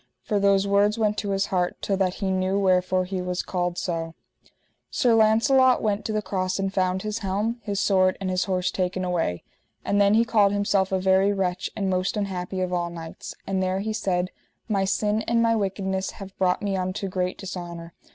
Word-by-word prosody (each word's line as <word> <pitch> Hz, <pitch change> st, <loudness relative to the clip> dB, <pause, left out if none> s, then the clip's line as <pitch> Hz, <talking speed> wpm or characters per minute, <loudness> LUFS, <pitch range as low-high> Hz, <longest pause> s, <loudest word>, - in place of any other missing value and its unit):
For 210 Hz, -2 st, 0 dB
those 200 Hz, 0 st, +3 dB
words 200 Hz, +2 st, +3 dB
went 210 Hz, -2 st, +1 dB
to 205 Hz, -, -3 dB
his 195 Hz, 0 st, +1 dB
heart, 180 Hz, -1 st, 0 dB
till 195 Hz, -, -1 dB
that 190 Hz, -1 st, 0 dB
he 195 Hz, -1 st, -2 dB
knew 190 Hz, +1 st, 0 dB
wherefore 185 Hz, -1 st, +2 dB
he 185 Hz, 0 st, -3 dB
was 180 Hz, 0 st, -2 dB
called 180 Hz, -1 st, -2 dB
so. 165 Hz, -2 st, -3 dB, 0.3 s
Then -, -, -28 dB, 0.4 s
Sir 245 Hz, -3 st, +2 dB
Launcelot 225 Hz, +4 st, +4 dB
went 210 Hz, -1 st, 0 dB
to -, -, -2 dB
the 215 Hz, 0 st, -1 dB
cross 185 Hz, -2 st, -1 dB
and 195 Hz, 0 st, -2 dB
found 185 Hz, -1 st, 0 dB
his 215 Hz, +1 st, -3 dB
helm, 210 Hz, +4 st, -1 dB
his 200 Hz, -2 st, -3 dB
sword, 185 Hz, -2 st, +3 dB
and 195 Hz, -, -3 dB
his 185 Hz, 0 st, 0 dB
horse 180 Hz, -2 st, 0 dB
taken 185 Hz, 0 st, -1 dB
away. 165 Hz, -, -1 dB, 0.4 s
And 205 Hz, 0 st, +2 dB
then 200 Hz, +1 st, +5 dB
he 230 Hz, +1 st, +4 dB
called 210 Hz, -4 st, +3 dB
himself 200 Hz, -2 st, +1 dB
a 190 Hz, -, +2 dB
very 190 Hz, +1 st, +3 dB
wretch, 185 Hz, -2 st, -1 dB
and 195 Hz, -, -1 dB
most 185 Hz, +2 st, 0 dB
unhappy 190 Hz, -2 st, -3 dB
of 180 Hz, 0 st, -2 dB
all 175 Hz, -1 st, 0 dB
knights; 165 Hz, -1 st, -8 dB
and 190 Hz, -1 st, -1 dB
there 185 Hz, 0 st, 0 dB
he 215 Hz, +2 st, -2 dB
said: 185 Hz, -4 st, -1 dB, 0.4 s
My 200 Hz, -4 st, +1 dB
sin 210 Hz, +2 st, 0 dB
and 235 Hz, 0 st, +2 dB
my 230 Hz, 0 st, +3 dB
wickedness 190 Hz, -2 st, -1 dB
have 195 Hz, -1 st, -9 dB
brought 185 Hz, +1 st, +1 dB
me 200 Hz, -1 st, 0 dB
unto 185 Hz, +2 st, -2 dB
great 185 Hz, -1 st, -2 dB
dishonour. 175 Hz, -3 st, -7 dB
190 Hz, 210 wpm, -25 LUFS, 185-205 Hz, 0.4 s, then